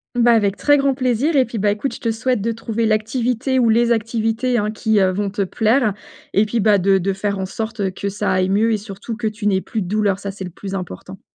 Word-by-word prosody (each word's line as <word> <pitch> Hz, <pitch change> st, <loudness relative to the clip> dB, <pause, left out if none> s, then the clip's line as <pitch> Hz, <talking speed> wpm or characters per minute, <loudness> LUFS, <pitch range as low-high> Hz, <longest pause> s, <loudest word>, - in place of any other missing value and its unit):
Bah 240 Hz, 0 st, +4 dB
avec 205 Hz, -3 st, +2 dB
très 290 Hz, 0 st, +4 dB
grand 275 Hz, -1 st, +1 dB
plaisir 260 Hz, +4 st, 0 dB
et 260 Hz, -2 st, +4 dB
puis 230 Hz, -2 st, -5 dB
bah 205 Hz, +1 st, +2 dB
écoute 210 Hz, +7 st, -3 dB
je -, -, -8 dB
te 230 Hz, -4 st, -1 dB
souhaite 230 Hz, 0 st, -1 dB
de 230 Hz, +3 st, 0 dB
trouver 230 Hz, 0 st, -2 dB
l'activité 245 Hz, +4 st, 0 dB
ou 235 Hz, -2 st, +3 dB
les 235 Hz, +1 st, +3 dB
activités, 230 Hz, +2 st, 0 dB
hein, 210 Hz, 0 st, 0 dB
qui, 220 Hz, -1 st, +1 dB
heu, 190 Hz, -1 st, +3 dB
vont 200 Hz, +2 st, -2 dB
te 200 Hz, 0 st, -1 dB
plaire 220 Hz, +2 st, +1 dB, 0.4 s
et 210 Hz, +2 st, +3 dB
puis 235 Hz, +1 st, -1 dB
bah 205 Hz, -1 st, +4 dB
de 195 Hz, +1 st, +3 dB
de 195 Hz, +2 st, -1 dB
faire 200 Hz, +1 st, -2 dB
en 190 Hz, -, -2 dB
sorte, 220 Hz, +3 st, -5 dB
heu, 190 Hz, -, 0 dB
que 200 Hz, +2 st, -4 dB
ça 205 Hz, +1 st, -2 dB
aille 185 Hz, 0 st, +1 dB
mieux 220 Hz, +3 st, +2 dB
et 215 Hz, -, +2 dB
surtout 205 Hz, +2 st, -7 dB
que 225 Hz, 0 st, -2 dB
tu 215 Hz, 0 st, -5 dB
n'aies 190 Hz, -2 st, +2 dB
plus 220 Hz, -4 st, -3 dB
de -, -, -7 dB
douleur, 205 Hz, -1 st, +1 dB
ça 200 Hz, 0 st, -5 dB
c'est 195 Hz, -1 st, -8 dB
le -, -, -6 dB
plus 195 Hz, +3 st, -8 dB
important. 180 Hz, -, -7 dB
215 Hz, 265 wpm, -20 LUFS, 200-235 Hz, 0.4 s, Bah